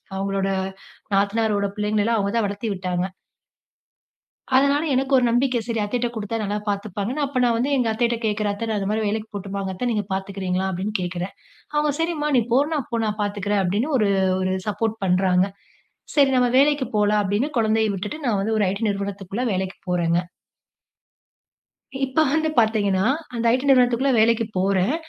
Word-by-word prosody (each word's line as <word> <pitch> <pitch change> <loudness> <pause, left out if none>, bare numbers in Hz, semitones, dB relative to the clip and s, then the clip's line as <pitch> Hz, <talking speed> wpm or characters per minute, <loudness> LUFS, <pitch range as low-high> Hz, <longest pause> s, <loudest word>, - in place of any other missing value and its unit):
அவுங்களோட 195 0 -1 0.6
நாத்தனாரோட 200 0 +1
பிள்ளைங்கள 210 0 0
எல்லாம் 230 -1 +2
அவுங்க 200 -1 0
தான் 220 - +2
வளத்தி 205 +3 -4
விட்டாங்க. 180 -1 -2 1.5
அதனால, 280 +3 +4
எனக்கு 265 +1 0
ஒரு 250 - +3
நம்பிக்கை, 245 +1 +2
சரி. 230 -2 -2
அத்தைட்ட 240 +3 -1
குடுத்தா 220 0 -3
நல்லா 205 +1 -1
பாத்துப்பாங்கன்னு. 205 +7 -2
அப்போ 270 -2 -2
நான் 235 -1 +3
வந்து, 260 +5 0
எங்க 245 -2 +1
அத்தைகிட்ட 235 +1 0
கேக்குறேன், 210 -1 0
"அத்தை 230 +3 -4
நான் 210 -2 0
இந்த 195 +1 -2
மாதிரி 215 0 0
வேலைக்கு 215 +1 -2
போட்டுமாங்க 195 -1 -4
அத்த? 245 +7 -3
நீங்க 210 -2 0
பாத்துக்கிறீங்களா?" 190 -1 -2
அப்டீன்னு 195 +4 -3
கேக்குறேன். 180 +1 -4 0.4
அவுங்க, 295 0 +2
"சரிம்மா 320 -3 0
நீ - - +5
போறனா, 290 +5 +2
நான் 275 - -4
போ, 230 - 0
நான் 210 0 -3
பாத்துக்குறேன்" 205 0 0
அப்டீன்னு 215 - 0
ஒரு 210 -3 +2 0.3
ஒரு 185 0 0
சப்போர்ட் 220 +2 -1
பண்றாங்க. 180 0 +3 0.7
"சரி. 280 -2 +5
நம்ம 250 -1 +3
வேலைக்கு 285 -1 +3
போலாம்" 210 0 +3
அப்டீன்னு 205 +9 0
கொழந்தைய 220 -1 +2
விட்டுட்டு, 210 +11 -5
நான் 205 -4 +1
வந்து 220 +2 0
ஒரு 205 - +3
ஐடி 200 +3 -4
நிறுவனத்துக்குள்ள 200 +3 -3
வேலைக்கு 190 0 -3
போறேங்க. 170 -1 +1 1.8
இப்போ 265 +4 +1
வந்து 315 0 +1
பாத்தீங்கன்னா, 205 -3 +2 0.3
அந்த 235 0 -2
ஐடி 260 +2 0
நிறுவனத்துக்குள்ள 255 +1 +4
வேலைக்கு 230 0 +3
போறேன். 190 +5 +2
210 Hz, 165 wpm, -23 LUFS, 195-245 Hz, 1.8 s, நீ